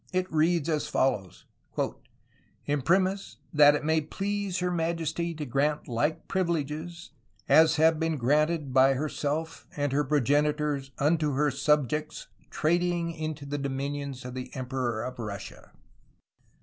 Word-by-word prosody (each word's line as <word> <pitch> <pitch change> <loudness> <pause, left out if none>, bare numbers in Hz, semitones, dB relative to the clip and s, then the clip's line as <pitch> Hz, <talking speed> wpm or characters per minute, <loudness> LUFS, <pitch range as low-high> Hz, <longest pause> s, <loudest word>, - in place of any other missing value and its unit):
It 185 -2 -1
reads 160 0 +2
as 155 -3 0
follows: 100 -8 -1 1.2
"Imprimis 185 +8 +1 0.2
y* 150 -1 +7
yt 150 0 -2
may 160 +1 +2
please 195 +4 -3
herr 180 0 0
Ma*^® 165 0 -2
to 150 - -4
graunt 145 +5 0
lyke 145 +6 -1
pvyleges 170 -1 -2 0.4
as 160 0 +6
have 160 +1 +4
bene 160 -1 0
graunted 150 +2 +1
by 135 +1 +5
herr 150 +4 -1
H^ 155 +3 -3
and 145 -1 -1
her 145 +2 +2
progenytors 145 0 +1
vnto 150 -1 +1
her 145 +1 +2
subiectes 150 +2 0 0.2
tradyng 170 +1 0
into 155 -2 -5
the 145 +1 -3
domynions 140 -1 -4
of 125 - -6
the 130 0 -6
Emperor 125 -3 -2
of 125 -1 -6
Russia. 105 -4 -7
150 Hz, 135 wpm, -28 LUFS, 140-165 Hz, 1.2 s, y